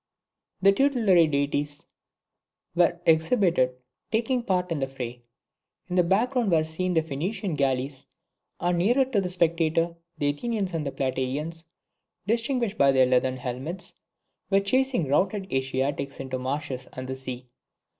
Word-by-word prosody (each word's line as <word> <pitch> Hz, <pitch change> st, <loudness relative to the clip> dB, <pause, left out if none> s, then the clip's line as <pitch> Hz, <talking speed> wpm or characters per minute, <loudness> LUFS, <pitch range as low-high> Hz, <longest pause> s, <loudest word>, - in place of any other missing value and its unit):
The 195 Hz, -, +8 dB
tutelary 210 Hz, -, +4 dB
deities 145 Hz, 0 st, -1 dB, 0.9 s
were 175 Hz, 0 st, +3 dB
exhibited 160 Hz, -, +3 dB, 0.4 s
taking 240 Hz, +3 st, +1 dB
part 180 Hz, -5 st, -1 dB
in 160 Hz, -, 0 dB
the 135 Hz, -, -1 dB
fray. 125 Hz, -2 st, -6 dB, 0.7 s
In -, -, 0 dB
the 180 Hz, -, +6 dB
back 200 Hz, +9 st, +2 dB
ground 245 Hz, -5 st, +1 dB
were 160 Hz, -2 st, +4 dB
seen 175 Hz, +3 st, -2 dB
the 160 Hz, -, +3 dB
Phoenician 165 Hz, +6 st, -3 dB
galleys; 135 Hz, -1 st, -1 dB, 0.5 s
and 175 Hz, 0 st, +1 dB
nearer 245 Hz, +9 st, +3 dB
to 245 Hz, -6 st, 0 dB
the 180 Hz, -, -2 dB
spectator, 170 Hz, -1 st, +1 dB, 0.2 s
the 145 Hz, -, +1 dB
Athenians 200 Hz, +3 st, -3 dB
and 155 Hz, -3 st, -2 dB
the -, -, -2 dB
Plataeans 135 Hz, +6 st, -2 dB, 0.6 s
(distinguished 230 Hz, 0 st, 0 dB
by 140 Hz, -1 st, +6 dB
their 130 Hz, -1 st, +5 dB
leathern 130 Hz, 0 st, +2 dB
helmets) 130 Hz, +9 st, -5 dB, 0.6 s
were 195 Hz, -1 st, +4 dB
chasing 250 Hz, -, +1 dB
routed 190 Hz, +7 st, 0 dB
Asiatics 135 Hz, +1 st, -1 dB
into 130 Hz, -1 st, -3 dB
the -, -, -7 dB
marshes 130 Hz, -1 st, -3 dB
and 130 Hz, 0 st, -6 dB
the 130 Hz, -, -3 dB
sea. 130 Hz, -1 st, -6 dB
165 Hz, 145 wpm, -26 LUFS, 135-195 Hz, 0.9 s, The